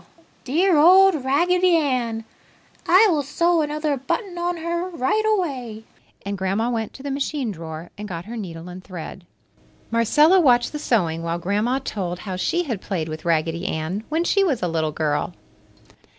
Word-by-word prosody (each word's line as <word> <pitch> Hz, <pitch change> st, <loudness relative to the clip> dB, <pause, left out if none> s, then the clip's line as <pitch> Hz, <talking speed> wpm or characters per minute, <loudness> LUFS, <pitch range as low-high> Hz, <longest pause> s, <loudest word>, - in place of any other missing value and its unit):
Dear 335 Hz, +6 st, +3 dB
old 365 Hz, -1 st, +6 dB
Raggedy 355 Hz, +6 st, +3 dB
Ann! 250 Hz, -7 st, 0 dB, 0.6 s
I 375 Hz, +6 st, +7 dB
will 305 Hz, -3 st, +1 dB
sew 335 Hz, +4 st, +1 dB
another 300 Hz, -1 st, -1 dB
button 355 Hz, -, -3 dB
on 350 Hz, 0 st, -2 dB
her 340 Hz, +2 st, -3 dB
right 365 Hz, +6 st, 0 dB
away!" 265 Hz, -, -2 dB, 0.4 s
and 200 Hz, 0 st, -3 dB
Grandma 200 Hz, +5 st, 0 dB
went 225 Hz, -3 st, -2 dB
to 265 Hz, -, -11 dB
the 285 Hz, -, -3 dB
machine 275 Hz, -3 st, -2 dB
drawer 165 Hz, -1 st, -8 dB
and 210 Hz, -, -5 dB
got 170 Hz, -3 st, -6 dB
her 230 Hz, +3 st, -7 dB
needle 175 Hz, -6 st, -7 dB
and 180 Hz, +1 st, -9 dB
thread. 180 Hz, -1 st, -9 dB, 0.6 s
Marcella 295 Hz, -, +4 dB
watched 245 Hz, -7 st, +4 dB
the 300 Hz, -, -5 dB
sewing 175 Hz, -, 0 dB
while 170 Hz, 0 st, -2 dB
Grandma 210 Hz, +8 st, 0 dB
told 190 Hz, -9 st, -4 dB
how 190 Hz, -3 st, -5 dB
she 345 Hz, -, 0 dB
had 235 Hz, -, -4 dB
played 165 Hz, -5 st, -3 dB
with 155 Hz, +1 st, -7 dB
Raggedy 165 Hz, +2 st, 0 dB
Ann 160 Hz, +7 st, -3 dB
when 320 Hz, +3 st, 0 dB
she 395 Hz, +3 st, +2 dB
was 285 Hz, -, 0 dB
a -, -, +2 dB
little 160 Hz, -2 st, -1 dB
girl. 150 Hz, -1 st, -1 dB
245 Hz, 170 wpm, -22 LUFS, -, 0.6 s, I